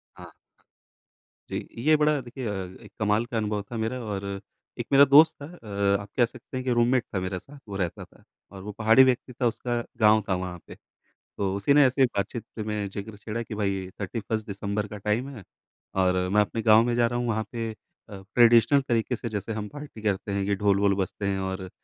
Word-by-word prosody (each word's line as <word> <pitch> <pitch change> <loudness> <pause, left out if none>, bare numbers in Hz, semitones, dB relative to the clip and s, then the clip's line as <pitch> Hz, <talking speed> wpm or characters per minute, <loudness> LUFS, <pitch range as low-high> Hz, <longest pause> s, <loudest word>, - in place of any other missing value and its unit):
हाँ। - - -12 1.2
जी, - - -4
ये 155 +7 +4
बड़ा 150 -1 +2
देखिए 125 +1 -8
अ, - - -1 0.3
एक - - -14
कमाल 105 +2 +2
का 120 -1 -4
अनुभव 105 -1 -1
था 115 - -4
मेरा 115 +3 -2
और 100 -2 -4 0.6
एक - - -2
मेरा 140 +1 +8
दोस्त 150 +4 +7
था 140 - -6
अ, 100 - -1
आप 100 - -11
कह 120 - +5
सकते 120 +2 -9
हैं 130 - -3
कि 125 - +1
रूममेट 120 +1 +3
था - - +1
मेरे 95 0 -3
साथ 140 +9 -15
वो 100 - -5
रहता 90 -4 -3
था - - -19 0.3
और 95 - -10
वो 105 - -6
पहाड़ी 110 +5 +5
व्यक्ति 125 0 0
था 125 0 0
उसका 120 +1 -2 0.2
गाँव 110 0 +5
था 95 - +2
वहाँ 90 -1 -5
पे। - - -10 0.6
तो 95 -1 -1
उसी 100 +8 +2
ने 145 -1 +7
ऐसे 130 +1 +4
बात-चीत 115 0 -3 0.2
में 105 -1 -2
जिक्र 100 +2 -7
छेड़ा 110 +2 -5
कि 110 - -7
भाई 100 -3 -2
31st 110 +2 -3
दिसम्बर 100 +1 -3
का 105 - -8
टाइम 105 +6 -1
है 110 - -10 0.6
और 90 0 +3
मैं 105 +2 +4
अपने 110 +2 -2
गाँव 110 0 +6
में 120 -1 0
जा 120 -1 +3
रहा 120 +1 -2
हूँ 120 - -2
वहाँ 110 -1 0
पे 115 -2 -3 0.4
अ, 100 -2 -9
ट्रेडिशनल 120 +3 +6
तरीके 120 +1 0
से 115 - -5
जैसे 105 +1 -4
हम 105 -1 -4
पार्टी 145 -5 -10
करते 100 -1 -1
हैं, 100 0 -1
ये 100 +1 0
ढोल-वोल 100 0 +2
बजते 100 +1 -3
हैं 100 -1 -1
और 95 -1 -4
110 Hz, 215 wpm, -26 LUFS, 100-120 Hz, 1.2 s, मेरा